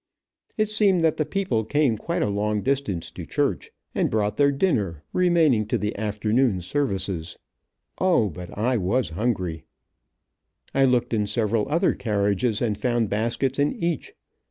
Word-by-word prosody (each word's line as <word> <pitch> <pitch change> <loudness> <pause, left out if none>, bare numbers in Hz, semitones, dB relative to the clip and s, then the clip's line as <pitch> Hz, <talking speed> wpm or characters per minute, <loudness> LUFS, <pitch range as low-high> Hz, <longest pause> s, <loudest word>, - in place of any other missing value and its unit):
It 215 - +3
seemed 205 -4 +3
that 160 -2 +2
the 155 - -1
people 185 - -1
came 140 +1 +1
quite 170 +10 -2
a - - +1
long 105 +1 -1
distance 130 -11 -1
to - - -8
church, - - -1 0.2
and - - +1
brought 105 -1 0
their 140 -1 +4
dinner, 105 - 0
remaining 165 - +3
to 120 - 0
the 105 0 -3
afternoon 105 +1 0
services. 95 - -2 0.6
O, 175 - +3
but 90 +3 -9
I 120 +4 +1
was 110 +6 0
hungry. 90 -5 -2 1.1
I 135 0 +4
looked 125 -1 +1
in 105 -2 +1
several 105 +1 0
other 165 +4 +2
carriages, 105 +1 0
and 110 -3 0
found 120 -2 0
baskets 120 +5 0
in 145 +1 +2
each. 170 -4 -3
115 Hz, 155 wpm, -24 LUFS, 105-140 Hz, 1.1 s, their